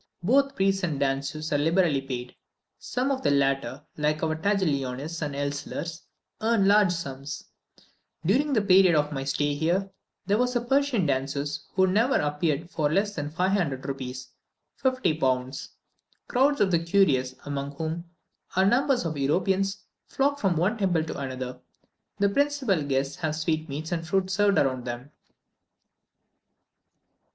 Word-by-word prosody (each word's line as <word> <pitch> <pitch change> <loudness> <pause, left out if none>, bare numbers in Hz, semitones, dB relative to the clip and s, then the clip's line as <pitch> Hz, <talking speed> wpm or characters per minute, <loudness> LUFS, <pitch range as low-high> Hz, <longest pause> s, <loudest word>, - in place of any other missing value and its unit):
Both 275 +7 +3
priests 195 0 +1
and 160 -7 -1
danseuses 140 +3 -1
are 145 - +2
liberally 165 -2 +2
paid. 125 -2 -6 0.4
Some 255 +3 -1
of 265 -1 -1
the - - +2
latter, 140 -1 +1
like 150 +1 0
our 160 -1 +1
Taglionis 160 -5 -1
and 145 -2 -3
Elslers, 145 +4 -4 0.4
earn 220 -3 +3
large 205 -2 +5
sums. 140 -4 -5 0.8
During 270 - +2
the 215 -5 +2
period 185 -3 +6
of 150 0 +1
my 135 -2 -3
stay 145 +1 0
here, 175 +6 0 0.3
there 205 +2 +2
was 250 0 +1
a 240 - +2
Persian 265 -5 +1
danseuse, 140 +1 -2
who 190 0 +5
never 220 +8 +2
appeared 150 +3 0
for 150 -2 0
less 200 +4 +1
than 145 -5 -4
500 175 -5 0
rupees 130 -2 -5 0.5
(50 255 - +1
pounds.) 130 -1 -1 0.6
Crowds 275 +3 +2
of 190 - +3
the 170 - +4
curious, 165 -8 +2
among 140 0 -4
whom 160 +2 -4 0.5
are 190 +1 +4
numbers 255 +2 +2
of 155 -3 -3
Europeans, 190 +7 0 0.2
flock 285 +1 0
from 190 - +1
one 200 +8 +1
temple 175 -5 +2
to 160 - -5
another; 130 -2 -5 0.6
the 200 - +3
principal 265 - +1
guests 140 +1 -1
have 160 -3 -2
sweetmeats 155 -1 -2
and 165 -1 -2
fruit 190 +1 0
served 200 +1 +3
round 130 -2 +1
to 125 - -5
them. 125 +4 -9
165 Hz, 150 wpm, -26 LUFS, 140-200 Hz, 0.8 s, period